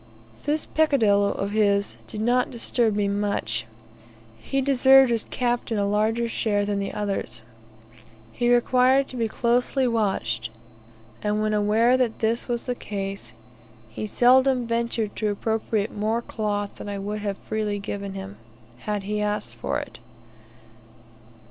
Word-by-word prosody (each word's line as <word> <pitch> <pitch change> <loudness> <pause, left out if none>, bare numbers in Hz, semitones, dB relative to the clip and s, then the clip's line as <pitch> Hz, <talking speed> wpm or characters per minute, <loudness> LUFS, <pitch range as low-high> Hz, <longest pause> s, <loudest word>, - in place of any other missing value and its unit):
This 300 +2 0
peccadillo 220 -10 +3
of 200 +1 -3
his 200 -1 +2
did 210 - -5
not 245 +2 +2
disturb 230 -2 0
me 205 -1 +1
much; 200 - -1 0.7
he 270 - -2
deserved 265 -1 +5
as 230 -2 +1
captain 240 -2 -1
a 200 - +1
larger 220 +3 +1
share 205 -3 0
than 205 -1 -1
the 195 0 -3
others. 195 - -3 0.9
He 240 - +1
required 255 +2 +4
to - - -9
be 230 -2 0
closely 245 +3 +1
watched, 190 - -1 0.7
and 210 0 0
when 215 0 0
aware 220 +4 +3
that 245 -3 0
this 225 +1 0
was 240 -1 -2
the 250 - -1
case, 195 - -5 0.6
he 215 - -5
seldom 255 +3 +4
ventured 230 -2 -1
to 215 - 0
appropriate 215 0 -1
more 220 +3 -1
cloth 205 -3 -3
than - - -7
I 200 - -3
would 205 +2 -4
have 200 -2 -3
freely 215 -1 -2
given 200 -1 -5
him, 195 +1 -7 0.4
had 210 +3 -3
he 210 +1 -2
asked 205 - -1
for 115 - -2
it. - - -9
215 Hz, 145 wpm, -24 LUFS, 200-240 Hz, 0.9 s, deserved